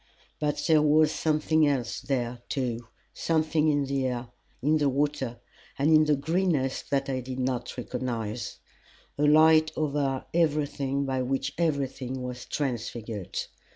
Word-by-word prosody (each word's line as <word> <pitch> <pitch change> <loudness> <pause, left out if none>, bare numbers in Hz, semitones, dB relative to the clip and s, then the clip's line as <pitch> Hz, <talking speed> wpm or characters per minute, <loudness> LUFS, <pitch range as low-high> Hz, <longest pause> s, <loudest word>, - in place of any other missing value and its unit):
But 150 -1 -1
there 155 -2 +5
was 155 +1 +4
something 155 0 +2
else 125 -4 -1
there, 125 -2 -2
too 120 -4 -2 0.3
something 160 -1 +1
in 145 -2 +2
the 135 -1 0
air, 125 -1 -3 0.3
in 155 +4 +2
the 145 -1 +3
water, 135 -3 -1 0.4
and 145 +3 +2
in 155 0 +6
the 150 -1 +3
greenness 155 -2 0
that 135 -1 -1
I 130 -1 -1
did 130 0 -6
not 130 -1 -2
recognize 120 -3 -4 0.6
a 150 - +3
light 155 +1 +6
over 140 -3 -1
everything 145 -4 +1
by 130 -1 -1
which 135 +1 -1
everything 135 -5 -1
was 125 0 -6
transfigured. 115 - -4
140 Hz, 140 wpm, -27 LUFS, 125-150 Hz, 0.6 s, in